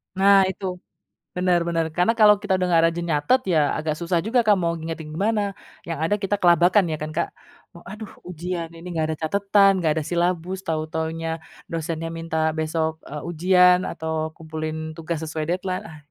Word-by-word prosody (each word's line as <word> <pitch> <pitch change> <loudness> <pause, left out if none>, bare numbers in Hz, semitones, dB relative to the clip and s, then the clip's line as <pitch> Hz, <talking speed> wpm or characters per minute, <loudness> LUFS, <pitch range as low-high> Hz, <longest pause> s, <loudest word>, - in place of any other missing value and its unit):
Nah 195 0 +5
itu, 190 +1 -5 0.7
bener 180 -1 +2
bener, 165 -1 0
karena 180 +7 +2
kalau 210 -1 +7
kita 205 -3 +1
udah 185 - 0
nggak 165 -1 +5
rajin 170 +1 -4
nyatet, 150 - +3
ya 160 - +4 0.2
agak 155 0 -2
susah 170 0 0
juga, 235 +3 +2
Kak, 210 -1 +5
mau 170 -2 0
ngingetin 160 -1 -6
gimana, 210 +6 +1 0.5
yang 165 -3 -3
ada 165 +6 +2
kita 200 0 -1
kelabakan 175 +2 +5
ya, - - 0
kan, 155 0 -4
Kak? 170 +1 -1 0.5
"Oh, 170 - -13
aduh 215 +1 -8 0.2
ujian, 175 -1 -5
ini 170 +1 -11
enggak 160 -1 +1
ada 155 - -4
catetan, 200 +2 +4
enggak 160 - +3
ada - - -3
silabus, 175 +1 -1
tau-taunya 160 0 -3 0.4
dosennya 165 0 -3
minta 165 -1 -4 0.2
besok," 160 0 -2
eee, 150 +1 -7
"ujian, 180 +2 +5
atau 160 0 -3
kumpulin 160 0 -6
tugas 165 0 -4
sesuai 155 0 -3
deadline, 185 +2 -2
ah." 160 - -11
170 Hz, 180 wpm, -23 LUFS, 160-185 Hz, 0.7 s, kalau